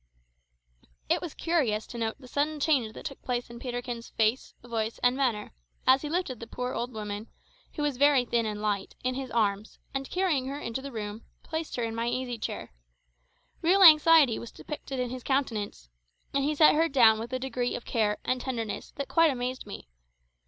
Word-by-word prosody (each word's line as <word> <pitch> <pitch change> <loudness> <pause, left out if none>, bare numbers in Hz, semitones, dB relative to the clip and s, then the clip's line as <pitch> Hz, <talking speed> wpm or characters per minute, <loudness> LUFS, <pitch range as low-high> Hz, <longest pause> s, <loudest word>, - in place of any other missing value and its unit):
It - - +2
was 340 - -6
curious 265 -11 0
to 240 - -9
note 225 -1 -1
the 255 - -13
sudden 295 +3 -1
change 270 -8 +2
that - - -10
took 275 - -6
place 245 -1 -3
in 235 - -9
Peterkin's 245 -2 -5
face, 220 +3 0
voice, 225 -2 -2
and 245 +1 +4
manner, 245 -6 0 0.3
as 260 +1 +6
he 295 - -4
lifted 315 -8 -2
the 230 - -8
poor 250 +2 -4
old 245 +2 -3
woman, 210 -1 -5 0.5
who 300 - -2
was 290 -4 0
very 280 -2 +5
thin 235 -1 +1
and 210 -1 -4
light, 205 -2 -1
in 255 0 0
his 265 0 -5
arms, 210 -2 0 0.2
and 270 0 -3
carrying 345 -9 +1
her 280 +2 -4
into 230 -1 -4
the 275 +1 -7
room, 215 -1 -5 0.2
placed 320 -1 -4
her 240 - -1
in 225 -1 -2
my 230 +1 -2
easy 245 -1 -2
chair. 135 - -5 0.9
Real 375 +4 +5
anxiety 310 -6 +8
was 235 - -8
depicted 275 -3 -6
in 250 -1 -1
his 255 0 -5
countenance, 220 - -2 0.4
and 275 - +1
he 300 +2 0
set 305 +1 +7
her 325 +2 +3
down 225 -5 +6
with 230 +2 -6
a 255 - 0
degree 255 -1 -2
of - - -7
care 215 -3 +1
and 255 0 0
tenderness 230 -5 -4
that 280 -1 -4
quite 330 -1 +4
amazed 255 -3 -3
me. 200 - -8
250 Hz, 200 wpm, -28 LUFS, 225-280 Hz, 0.9 s, anxiety